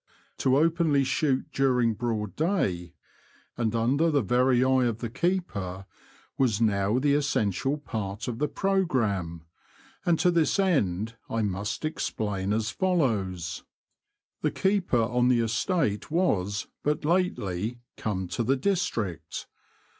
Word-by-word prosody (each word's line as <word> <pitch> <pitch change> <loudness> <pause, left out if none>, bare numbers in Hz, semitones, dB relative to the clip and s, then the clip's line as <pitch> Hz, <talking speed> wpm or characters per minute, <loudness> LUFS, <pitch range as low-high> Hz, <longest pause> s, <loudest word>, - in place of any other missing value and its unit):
To 130 0 +3
openly 160 -2 +3
shoot 135 0 0
during 125 -4 +2
broad 110 -2 -3
day, 95 - -1 0.6
and 115 -1 -1
under 135 +9 +2
the 145 -5 +2
very 125 +3 +3
eye 130 -1 +3
of 115 -3 0
the 115 -1 -5
keeper, 100 - -2 0.5
was 120 -6 +2
now 105 0 +2
the 140 +2 +2
essential 140 -2 0
part 105 -7 -5
of 120 -2 -4
the 150 - +1
programme; 115 - 0 0.6
and 170 -2 +3
to 180 - +3
this 165 0 +2
end 115 - +1
I 115 -1 0
must 100 +7 -2
explain 105 -10 -2
as 110 +1 0
follows: 100 - 0 0.8
The - - +2
keeper 190 - +1
on 125 +2 +1
the 125 -2 +4
estate 115 - 0
was 105 - 0 0.2
but 150 0 -1
lately 120 - 0 0.2
come 95 -4 -3
to 90 - -2
the 130 +4 +2
district. 125 - -2
120 Hz, 130 wpm, -27 LUFS, 105-150 Hz, 0.8 s, the